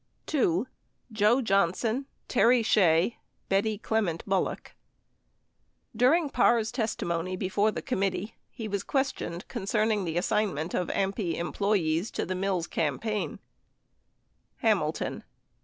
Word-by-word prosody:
2. 220 - +1 0.5
JOE 220 +4 +3
JOHNSON, 220 +6 +1 0.2
TERRY 240 -1 +4
SHEA, 180 -1 +3 0.3
BETTY 205 +2 +1
CLEMENT 205 -6 -1
BULLOCK 195 -2 -1 1.2
During 285 +8 +4
Parr's 235 -3 +3
testimony 185 -6 -2
before 195 +3 +1
the - - -4
committee, 200 -2 -1 0.2
he 225 - -6
was 200 -2 -2
questioned 265 -10 -2
concerning 215 -2 0
the 165 -1 -2
assignment 175 -3 0
of 180 - 0
AMPI 195 -3 -1
employees 175 -1 0
to - - -3
the 185 - -2
Mills 185 -2 -1
campaign: 190 - -2 1.2
Hamilton. - - 0
200 Hz, 105 wpm, -28 LUFS, 180-225 Hz, 1.2 s, TERRY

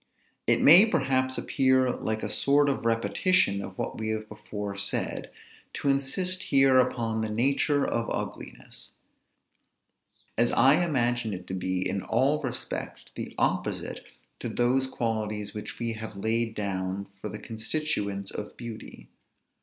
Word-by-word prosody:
It - - +4
may 180 +9 +9
perhaps 130 - +1
appear 130 -1 +2
like 110 -2 -3
a - - -1
sort 145 +1 +3
of 135 -4 -1
repetition 115 - +2
of 95 -1 -8
what - - -4
we 110 0 -2
have 110 0 -2
before 105 -1 -6
said, 100 0 -2 0.5
to 140 - -1
insist 180 +7 +1
here 135 -1 +5
upon 115 -3 0
the 110 - -2
nature 140 +5 +2
of 115 0 -1
ugliness; - - -6 1.5
as 120 0 +4
I 135 +8 +5
imagine 120 - 0
it 90 0 -9
to 95 - -6
be 95 0 -1
in 100 - -2
all 135 +9 +1
respects - - -5
the - - -7
opposite - - -1 0.4
to - - -4
those 130 +2 +2
qualities 110 -4 -2
which 105 - -6
we 115 -1 -2
have 110 -1 -7
laid 115 +2 0
down 95 -1 -2 0.2
for 105 - -4
the 105 - -6
constituents 110 -3 -3
of 105 - -7
beauty. 115 -2 -9
115 Hz, 145 wpm, -27 LUFS, 105-135 Hz, 1.5 s, may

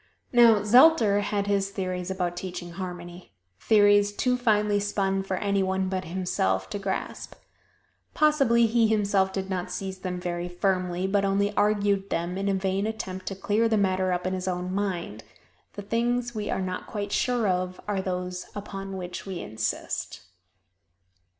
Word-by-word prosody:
Now, 230 -4 +6
Zelter 225 -3 +6
had 205 0 -1
his 200 -1 +1
theories 185 -2 -4
about 180 -2 -2
teaching 180 -1 -6
harmony 175 - -8 0.3
theories 205 -1 +4
too 250 +4 +1
finely 210 -4 +2
spun 195 -1 0
for 195 -1 -3
any 200 0 0
one 190 0 0
but 185 -1 -3
himself 165 - -1
to 205 - -3
grasp. 195 -1 -4 0.8
Possibly 275 -7 +4
he 225 0 +3
himself 200 -3 +2
did 190 0 -3
not 185 -2 -3
seize 190 +1 -5
them 180 -1 -4
very 175 0 -3
firmly, 185 0 -1
but 195 +1 +1
only 200 +1 +1
argued 205 -1 +1
them 170 +2 -2
in 195 +1 -1
a 195 - +1
vain 190 +2 -1
attempt 190 -4 -5
to 195 - -3
clear 210 +4 +1
the 220 - +2
matter 185 -2 +1
up 180 0 -1
in 185 - -1
his 185 0 -3
own 180 0 -2
mind. 180 - -3 0.5
The 205 - -7
things 240 +3 0
we 210 -2 -4
are - - -1
not 185 0 -4
quite 205 -1 -4
sure 245 -2 +1
of 185 0 -1
are 200 -2 0
those 180 -1 -4
upon 195 -1 -6
which 180 +1 -6
we 185 -3 -4
insist. 110 +1 -4
195 Hz, 165 wpm, -26 LUFS, 185-205 Hz, 0.8 s, Now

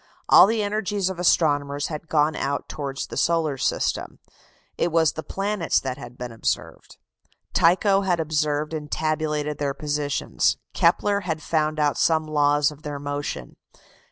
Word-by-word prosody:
All - - +8
the 220 0 0
energies 205 -2 -1
of 180 - -8
astronomers 145 -5 +2
had 155 0 -7
gone 150 0 +2
out 140 0 -2
towards 140 -2 -4
the - - -8
solar 165 -4 +1
system. 130 - -1 0.6
It 170 - 0
was 160 -2 +3
the 160 - -5
planets 195 -2 -1
that 130 0 -5
had 125 -2 -10
been 125 -1 -6
observed. 115 - -4 0.6
Tycho 195 +4 +4
had 180 -3 0
observed 150 -1 -1
and 150 -2 -5
tabulated 150 -1 -1
their 140 -1 -1
positions. 145 -1 0 0.2
Kepler 205 -1 +2
had 165 -5 -3
found 155 -1 0
out 145 -1 +1
some 160 -1 +2
laws 145 -1 +2
of 150 0 -14
their 150 -1 -5
motion. 145 0 -5
155 Hz, 155 wpm, -24 LUFS, 145-170 Hz, 0.6 s, All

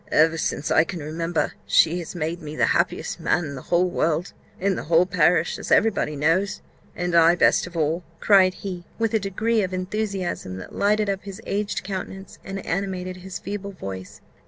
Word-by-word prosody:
"Ever 160 +1 +4
since 150 - -2
I 160 - +6
can 170 0 -6
remember, 165 +2 -1
she 170 +2 +4
has 170 +1 -7
made 170 +1 -3
me 150 -1 -7
the - - +3
happiest - - -1
man 175 - +1
in 140 - -6
the 130 - -7
whole 175 +1 +3
world, 170 0 0 0.3
in 195 0 +1
the - - -5
whole 165 +3 +4
parish, 175 -1 +2
as - - -6
every 225 +1 +5
body 150 -6 -2
knows, 165 +7 +1 0.4
and 175 0 -2
I 170 0 +6
best 180 - +3
of 175 -1 -8
all!" 160 +3 0 0.2
cried 190 -3 +5
he, 180 -3 -6
with 225 -1 0
a 220 - +3
degree 220 +3 0
of 185 -1 -2
enthusiasm 185 - -3
that 95 - -9
lighted 210 +1 +2
up 195 -1 -1
his 195 +1 -8
aged 205 +1 -2
countenance, 190 0 -6
and 195 0 -6
animated 185 0 -3
his 185 +1 -7
feeble 200 0 -6
voice. 95 - -8
180 Hz, 195 wpm, -24 LUFS, 165-195 Hz, 0.4 s, I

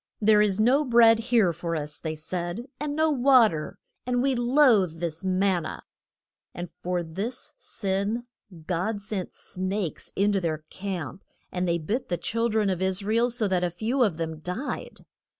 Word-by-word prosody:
There 210 -1 +5
is 205 -1 +2
no 255 +7 +4
bread 230 -3 +6
here 230 -6 +3
for 170 0 -3
us, 150 -1 -4
they 160 -1 -4
said, 175 +7 -4
and 290 0 -3
no 315 0 +3
wa 255 -4 +6
ter, 155 -3 -5 0.3
and 245 0 0
we 275 0 +2
loathe 240 - +3
this 165 0 -3
man 185 -1 +2
na. 155 - -6 0.7
And 175 0 -6
for 180 -1 -1
this 200 +10 -5
sin 200 +3 -1 0.4
God 190 +5 -1
sent 200 -2 -4
snakes 185 -1 -3
in 205 +1 +3
to 195 -1 +1
their 155 -2 -2
camp, 185 -3 -5 0.3
and 180 0 -1
they 170 0 +2
bit 215 - -3
the 175 - 0
chil 230 +5 -1
dren 215 -3 +1
of 185 -1 -3
Is 190 +1 0
ra 215 +2 0
el 235 +1 +3
so 230 -3 +1
that 185 -2 +1
a 180 - +1
few 225 +10 -1
of 200 -9 +2
them 160 -1 -4
died. 180 - -5
195 Hz, 185 wpm, -26 LUFS, 175-235 Hz, 0.7 s, bread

